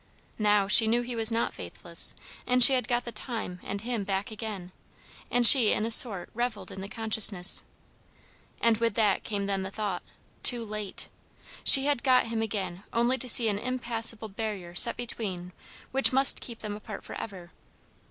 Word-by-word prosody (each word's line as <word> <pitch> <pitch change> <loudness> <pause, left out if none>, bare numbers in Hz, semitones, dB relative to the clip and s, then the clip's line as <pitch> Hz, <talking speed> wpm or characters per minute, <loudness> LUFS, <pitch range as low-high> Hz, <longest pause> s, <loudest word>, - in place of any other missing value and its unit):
Now 210 -2 0
she 220 +2 +5
knew 240 +2 -1
he 240 0 -8
was 225 0 0
not 230 +1 -3
faithless, - - -1 0.3
and 250 0 +3
she 270 - +8
had 255 -1 -2
got 240 0 -3
the 235 - -8
time 220 -5 -8
and 200 0 -7
him 235 -2 -5
back 195 +2 -6
again, 210 -5 -9 0.6
and 245 0 +1
she 230 -3 +8
in 215 - -4
a 230 - 0
sort 210 -6 +4
revelled 220 -5 -6
in 190 - -11
the 195 - -10
consciousness. 215 -4 +1 0.9
And 230 -1 0
with 230 -2 -3
that 215 -3 -1
came 205 -2 -6
then 195 -1 -4
the 190 - -7
thought, 200 -3 -6 0.4
"Too 240 -2 +2
late!" 210 -2 -6 0.6
She 270 0 +8
had 285 -4 -2
got 255 -2 +1
him 225 -1 -5
again 200 -4 -7
only 240 +3 -2
to 255 - +1
see 230 0 +7
an 205 -2 -3
impassable 230 -2 -5
barrier 200 -4 -8
set 230 +6 +7
between 190 -7 -6 0.4
which 270 +1 +4
must 265 +1 +3
keep 235 -2 -10
them 210 -1 -7
apart 210 0 -12
for - - -10
ever. 180 -4 -11
220 Hz, 180 wpm, -25 LUFS, 200-240 Hz, 0.9 s, she